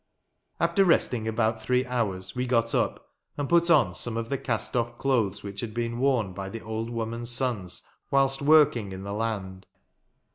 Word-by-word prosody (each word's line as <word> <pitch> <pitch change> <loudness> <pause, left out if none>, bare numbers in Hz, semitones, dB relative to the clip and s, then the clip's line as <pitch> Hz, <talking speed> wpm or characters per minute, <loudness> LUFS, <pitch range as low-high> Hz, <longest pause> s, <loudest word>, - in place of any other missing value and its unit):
After 195 - +3
resting 125 - +2
about 110 0 0
three 125 +2 +1
hours 105 -7 -1
we 125 0 -1
got 115 -2 +1
up, - - -1 0.3
and 145 -1 -2
put 170 +1 +3
on 140 - +5
some 115 +5 -4
of 115 0 -3
the 140 - 0
cast 115 0 -2
off 120 0 -1
clothes 110 -7 0
which 100 0 -6
had 110 -2 -6
been 120 0 -2
worn 125 -8 +1
by 95 +1 -5
the 115 +2 -7
old 110 +1 -4
woman's 115 0 -4
sons 120 -8 -2 0.3
whilst 135 0 +2
working 140 -9 +4
in 95 0 -7
the 100 0 -5
land. 100 -4 -3
115 Hz, 180 wpm, -27 LUFS, 105-130 Hz, 0.3 s, on